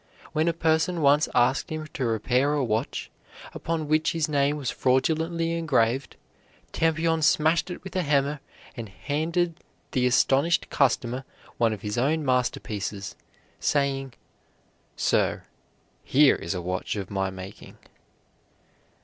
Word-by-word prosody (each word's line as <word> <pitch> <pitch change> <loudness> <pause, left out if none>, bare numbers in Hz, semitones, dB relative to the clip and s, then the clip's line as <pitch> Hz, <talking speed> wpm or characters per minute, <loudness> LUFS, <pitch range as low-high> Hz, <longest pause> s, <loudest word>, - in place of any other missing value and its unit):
When 155 +1 +1
a - - +4
person 165 +1 +1
once 145 +2 +4
asked 125 +6 +2
him 155 0 -4
to 135 - -2
repair 125 +6 +1
a 145 - +1
watch 110 -2 -2 0.4
upon 160 -2 -3
which 155 +2 +2
his 165 -2 0
name 145 0 +1
was 135 -5 -2
fraudulently 160 +6 +1
engraved, 135 -6 +1 0.6
Tampion 165 0 +1
smashed 160 +3 +3
it 180 - -7
with 190 -1 -9
a 185 - +2
hammer, 145 -1 +1 0.4
and 115 -4 -6
handed 165 - -2 0.3
the 125 -3 +2
astonished 135 +6 +2
customer 130 -1 +1 0.3
one 115 -1 +3
of 105 -3 -5
his 105 +2 -2
own 150 +4 +1
master 125 -1 +1
pieces, 100 -2 -5 0.4
saying, 135 -2 0 0.8
"Sir, - - +1 0.6
here 140 +1 +5
is - - -4
a 90 - -4
watch 90 +3 -3
of 100 -2 -5
my 95 -1 -1
making." 95 +2 -10
140 Hz, 135 wpm, -26 LUFS, 120-160 Hz, 0.8 s, here